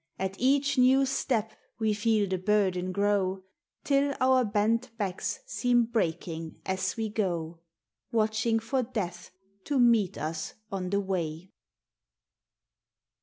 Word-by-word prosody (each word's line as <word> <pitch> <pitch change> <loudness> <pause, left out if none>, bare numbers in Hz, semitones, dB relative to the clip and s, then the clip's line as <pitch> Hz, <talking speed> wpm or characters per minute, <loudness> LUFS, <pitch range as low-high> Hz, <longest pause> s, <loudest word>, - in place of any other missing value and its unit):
At 190 0 -2
each 275 +2 +2
new 265 +2 +5
step 245 -5 -1 0.3
we 220 -2 +1
feei 215 -1 +1
the 185 -1 -2
burden 185 -2 +1
grow, 195 -1 0 0.4
Till 280 0 +2
our 255 0 +4
bent 225 +3 +1
backs 195 - -3
seem 245 - +2
breaking 165 -7 -3
as 190 +1 -1
we 225 -1 -1
go, 175 -6 -2 0.5
Watching 220 0 +1
for 235 +4 -1
Death 215 -8 -4 0.4
to 285 - 0
meet 235 -6 +4
us 155 +2 -4 0.2
on 185 -2 -3
the 200 +1 +1
way. 180 -2 -3
210 Hz, 125 wpm, -28 LUFS, 185-240 Hz, 0.5 s, new